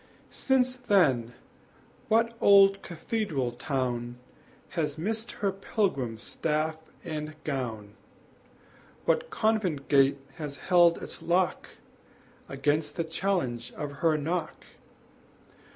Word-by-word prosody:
Since 255 Hz, -1 st, +1 dB
then 155 Hz, -, +2 dB, 0.7 s
what 230 Hz, +1 st, +3 dB
old 195 Hz, -1 st, +6 dB
cathedral 165 Hz, -, -2 dB
town 120 Hz, -2 st, -3 dB, 0.5 s
Has 155 Hz, -4 st, -2 dB
missed 220 Hz, +7 st, -3 dB
her 200 Hz, -1 st, -1 dB
pilgrim 190 Hz, -, -1 dB
staff 155 Hz, +6 st, -2 dB, 0.3 s
and 155 Hz, -2 st, -5 dB
gown, 115 Hz, -8 st, -4 dB, 1.1 s
What 485 Hz, +1 st, +1 dB
convent 210 Hz, -, 0 dB
gate 140 Hz, -1 st, +5 dB, 0.2 s
has 150 Hz, -3 st, -5 dB
held 175 Hz, +1 st, +4 dB
its -, -, -7 dB
lock 175 Hz, +2 st, +1 dB, 0.8 s
Against 145 Hz, +2 st, 0 dB
the 165 Hz, -, -1 dB
challenge 160 Hz, -9 st, -2 dB
of 145 Hz, -1 st, -6 dB
her 160 Hz, -2 st, +3 dB
knock! 160 Hz, +2 st, -3 dB
160 Hz, 100 wpm, -28 LUFS, 135-195 Hz, 1.1 s, old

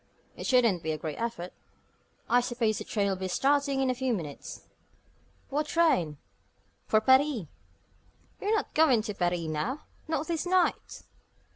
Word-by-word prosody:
It -, -, -5 dB
shouldn't 235 Hz, -9 st, +3 dB
be 160 Hz, -, -2 dB
a -, -, -3 dB
great 155 Hz, +5 st, -5 dB
effort. 225 Hz, -7 st, -4 dB, 0.7 s
I 245 Hz, -, +4 dB
suppose 235 Hz, -3 st, 0 dB
the -, -, -4 dB
train 205 Hz, -2 st, -1 dB
will 195 Hz, -, 0 dB
be 190 Hz, 0 st, -4 dB
starting 275 Hz, +6 st, +1 dB
in 260 Hz, -1 st, +2 dB
a -, -, 0 dB
few 255 Hz, -1 st, -1 dB
minutes?" 150 Hz, -7 st, -7 dB, 0.9 s
"What 300 Hz, +2 st, 0 dB
train?" 180 Hz, -, +2 dB, 0.7 s
"For 215 Hz, -, +4 dB
Paris." 260 Hz, -, +3 dB, 1.0 s
"You're 420 Hz, +2 st, +1 dB
not 430 Hz, -, -2 dB
going 270 Hz, -8 st, +4 dB
to 210 Hz, -2 st, -4 dB
Paris 175 Hz, -2 st, 0 dB
now 165 Hz, -, -3 dB, 0.3 s
not 315 Hz, -1 st, -1 dB
this 335 Hz, 0 st, -2 dB
night?" 370 Hz, 0 st, 0 dB
240 Hz, 155 wpm, -29 LUFS, 185-285 Hz, 1.0 s, I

